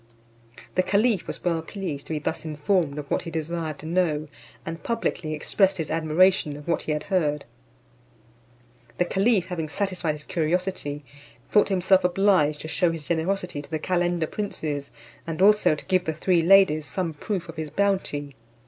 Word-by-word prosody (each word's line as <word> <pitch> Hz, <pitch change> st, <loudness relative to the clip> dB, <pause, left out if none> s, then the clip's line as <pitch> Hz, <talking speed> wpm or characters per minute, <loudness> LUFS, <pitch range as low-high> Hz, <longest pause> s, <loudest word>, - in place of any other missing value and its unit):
The 185 Hz, -, +3 dB
caliph 205 Hz, +1 st, +1 dB
was -, -, -5 dB
well 170 Hz, -2 st, +1 dB
pleased 160 Hz, -5 st, -6 dB
to -, -, -3 dB
be -, -, 0 dB
thus 155 Hz, +2 st, -3 dB
informed 155 Hz, 0 st, 0 dB
of 145 Hz, -1 st, -7 dB
what -, -, +1 dB
he -, -, -7 dB
desired 160 Hz, -1 st, -3 dB
to -, -, -11 dB
know; 160 Hz, -3 st, 0 dB, 0.4 s
and 165 Hz, 0 st, -5 dB
publicly 175 Hz, -8 st, -2 dB
expressed 190 Hz, +5 st, +1 dB
his 160 Hz, -4 st, -3 dB
admiration 160 Hz, -1 st, +3 dB
of 150 Hz, -, -12 dB
what 170 Hz, -, +1 dB
he -, -, -3 dB
had 150 Hz, 0 st, -1 dB
heard. 150 Hz, -7 st, 0 dB, 1.5 s
The 180 Hz, -, +2 dB
caliph 195 Hz, +1 st, +2 dB
having 165 Hz, -4 st, -3 dB
satisfied 185 Hz, -3 st, -1 dB
his 150 Hz, 0 st, -9 dB
curiosity, 165 Hz, -3 st, -2 dB, 0.5 s
thought 210 Hz, -, +4 dB
himself 190 Hz, 0 st, +3 dB
obliged 180 Hz, -5 st, +3 dB
to -, -, -6 dB
shew 175 Hz, +2 st, +2 dB
his 165 Hz, -2 st, -5 dB
generosity 175 Hz, -1 st, -1 dB
to 145 Hz, -, -15 dB
the 160 Hz, -, -1 dB
calender 175 Hz, 0 st, 0 dB
princes, 150 Hz, -7 st, -4 dB, 0.4 s
and 165 Hz, 0 st, -4 dB
also 210 Hz, -4 st, +5 dB
to -, -, -11 dB
give 185 Hz, -1 st, +1 dB
the 160 Hz, -, -1 dB
three 170 Hz, +2 st, +2 dB
ladies 170 Hz, -4 st, +5 dB
some 165 Hz, +5 st, -2 dB
proof 180 Hz, +4 st, -4 dB
of 165 Hz, -1 st, -10 dB
his 155 Hz, -1 st, -4 dB
bounty. 155 Hz, -5 st, -1 dB
165 Hz, 175 wpm, -25 LUFS, 155-190 Hz, 1.5 s, also